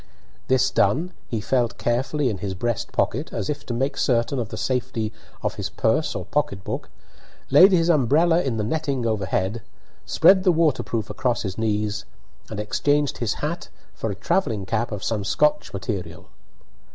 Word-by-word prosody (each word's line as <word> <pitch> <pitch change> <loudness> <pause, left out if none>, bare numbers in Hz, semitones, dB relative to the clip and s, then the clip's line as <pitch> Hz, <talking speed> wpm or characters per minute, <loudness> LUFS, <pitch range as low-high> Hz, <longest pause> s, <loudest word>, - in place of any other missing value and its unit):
This 130 -1 +3
done, 155 - +2
he 115 - -2
felt 120 +2 0
carefully 130 +3 0
in 100 - -5
his 95 -2 -4
breast 120 +3 -2
pocket, - - -1
as - - -2
if 145 - -5
to 120 - -2
make 135 +4 0
certain 125 +1 +1
of 115 -3 -3
the 110 - -6
safety 115 -3 -2 0.3
of - - 0
his - - -3
purse - - 0
or - - -4
pocket 95 -1 -1
book, - - -5 0.6
laid 180 +8 +8
his 170 -3 +3
umbrella 165 +3 +4
in 130 -7 -1
the 105 - 0
netting 140 0 -1
overhead, 105 0 -1 0.5
spread 190 -1 +5
the 185 - +5
waterproof 150 -9 0
across 125 -2 -1
his 95 -2 -3
knees, 105 -1 -1 0.4
and 110 - -5
exchanged 145 +7 +1
his 120 -3 0
hat 170 +3 -4 0.2
for 110 - -3
a 100 - -3
travelling 110 - 0
cap 115 +4 -1
of 105 -1 -5
some 105 -3 -1
Scotch 150 +8 +1
material. 90 -4 -5
120 Hz, 170 wpm, -23 LUFS, 105-145 Hz, 0.6 s, laid